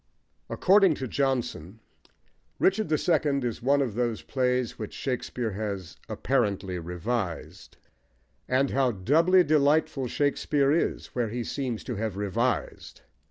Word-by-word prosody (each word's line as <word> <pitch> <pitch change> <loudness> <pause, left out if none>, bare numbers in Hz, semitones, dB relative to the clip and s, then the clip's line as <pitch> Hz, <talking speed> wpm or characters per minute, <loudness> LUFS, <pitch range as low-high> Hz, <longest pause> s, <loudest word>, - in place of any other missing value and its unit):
According 195 -3 +4
to 130 - -4
Johnson, 120 - -2 0.8
Richard 200 +3 +2
the 155 - +2
Second 145 -5 +1
is 120 - -3
one 140 +3 +3
of 120 -6 -3
those 120 -1 -2
plays 125 -2 -1
which 110 - -6
Shakespeare 125 -3 -3
has 100 -3 -5
"apparently 100 -8 -1
revised;" 90 +2 -4 0.7
and 130 +2 +2
how 135 -1 +2
doubly 165 - +4
delightful 145 -3 +2
Shakespeare 145 +1 +1
is 165 - -1
where 120 -3 -1
he 120 +2 -3
seems 125 -3 -3
to 120 -5 -5
have 105 -2 -3
revised! 110 +5 -2
125 Hz, 125 wpm, -27 LUFS, 110-140 Hz, 0.8 s, According